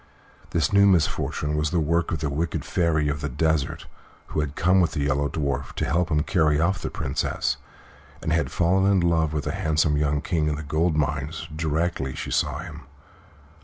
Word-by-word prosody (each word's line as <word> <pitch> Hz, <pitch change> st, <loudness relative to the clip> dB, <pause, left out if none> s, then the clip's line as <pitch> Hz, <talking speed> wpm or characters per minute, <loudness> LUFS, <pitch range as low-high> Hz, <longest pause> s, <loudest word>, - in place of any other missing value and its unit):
This 80 Hz, +1 st, 0 dB
new 100 Hz, 0 st, +6 dB
misfortune 80 Hz, -4 st, +1 dB
was 75 Hz, 0 st, 0 dB
the 85 Hz, +1 st, +1 dB
work 85 Hz, +2 st, +1 dB
of 80 Hz, -4 st, -2 dB
the 75 Hz, -, -1 dB
wicked 80 Hz, +4 st, -2 dB
Fairy 80 Hz, -4 st, +1 dB
of 75 Hz, 0 st, -2 dB
the 75 Hz, -, -2 dB
Desert, 80 Hz, +2 st, 0 dB, 0.4 s
who -, -, -2 dB
had 75 Hz, -1 st, -2 dB
come 95 Hz, +2 st, +3 dB
with 85 Hz, -3 st, +1 dB
the 75 Hz, -, -2 dB
Yellow 70 Hz, 0 st, +1 dB
Dwarf 70 Hz, -4 st, -2 dB
to -, -, -2 dB
help 85 Hz, +2 st, +1 dB
him 75 Hz, -1 st, +2 dB
carry 80 Hz, -4 st, +2 dB
off 95 Hz, +3 st, +1 dB
the -, -, -3 dB
Princess, 70 Hz, +1 st, -1 dB, 0.6 s
and 80 Hz, -, -1 dB
had 85 Hz, -, +1 dB
fallen 95 Hz, +3 st, +3 dB
in 100 Hz, -, +4 dB
love 85 Hz, -3 st, +2 dB
with 75 Hz, -1 st, -2 dB
the -, -, -2 dB
handsome 75 Hz, -1 st, +1 dB
young 75 Hz, 0 st, +1 dB
King 80 Hz, -2 st, 0 dB
of 75 Hz, -, -1 dB
the 75 Hz, -, -6 dB
Gold 80 Hz, +3 st, 0 dB
Mines 75 Hz, +2 st, -2 dB
directly 80 Hz, -3 st, -1 dB
she -, -, -5 dB
saw -, -, 0 dB
him. -, -, -9 dB
80 Hz, 200 wpm, -24 LUFS, 75-85 Hz, 0.6 s, new